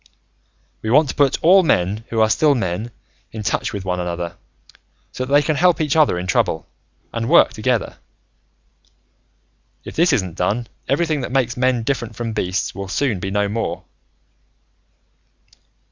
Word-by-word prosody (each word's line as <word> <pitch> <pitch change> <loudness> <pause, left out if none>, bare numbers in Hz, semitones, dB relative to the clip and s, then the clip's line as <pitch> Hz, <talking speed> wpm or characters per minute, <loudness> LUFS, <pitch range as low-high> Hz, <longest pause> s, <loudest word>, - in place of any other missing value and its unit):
"We 110 - -4
want 145 +4 +4
to - - -4
put 140 -2 +3
all 185 +4 +7
men 105 - 0
who 115 -1 0
are 110 - +4
still 150 +3 +3
men 105 0 -2 0.4
in 110 -1 -6
touch - - -1
with 100 -2 -6
one 90 -1 -1
another, 85 -1 -4 0.8
so 130 - -4
that 135 - -9
they 145 +1 +5
can 155 +1 0
help 175 +2 +3
each 150 -2 0
other 155 - +3
in 90 - -4
trouble, 80 -3 0 0.5
and 115 +1 -2
work 170 - +5
together. 115 +1 -1 1.9
"If - - -9
this 170 +2 +3
isn't 95 - -1
done, 105 +7 0 0.2
everything 155 +1 0
that 125 - -5
makes 125 -2 0
men 125 -2 +1
different 120 -3 -3
from 115 -1 -4
beasts 95 -3 -2
will 100 0 -6
soon 110 0 -1
be 95 - -4
no 100 +1 0
more." 115 +3 -3
115 Hz, 160 wpm, -20 LUFS, 95-140 Hz, 1.9 s, all